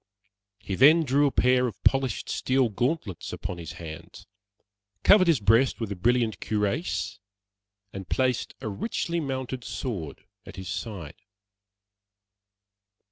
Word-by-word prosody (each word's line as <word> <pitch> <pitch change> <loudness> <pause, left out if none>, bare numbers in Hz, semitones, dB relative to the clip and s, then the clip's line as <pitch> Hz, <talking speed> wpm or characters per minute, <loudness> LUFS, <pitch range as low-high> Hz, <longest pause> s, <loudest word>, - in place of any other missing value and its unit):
He 100 -1 -6
then 150 - +6
drew 145 +1 +3
a - - 0
pair 125 0 +3
of 105 -4 -7
polished 135 -5 +1
steel 130 -2 +1
gauntlets 120 - -2
upon 90 - -5
his 80 -2 -7
hands, 80 -2 -10 0.8
covered 195 -3 +6
his 165 -7 +4
breast 115 +6 +3
with 110 -3 -3
a - - -2
brilliant 115 +3 +1
cuirass, 110 - -2 0.7
and 95 -2 -8
placed 130 -2 0
a - - -4
richly 170 - -2
mounted 130 -4 -4
sword 100 - -5 0.2
at - - -11
his 95 -1 -7
side. 90 -6 -6
120 Hz, 130 wpm, -26 LUFS, 100-135 Hz, 0.8 s, then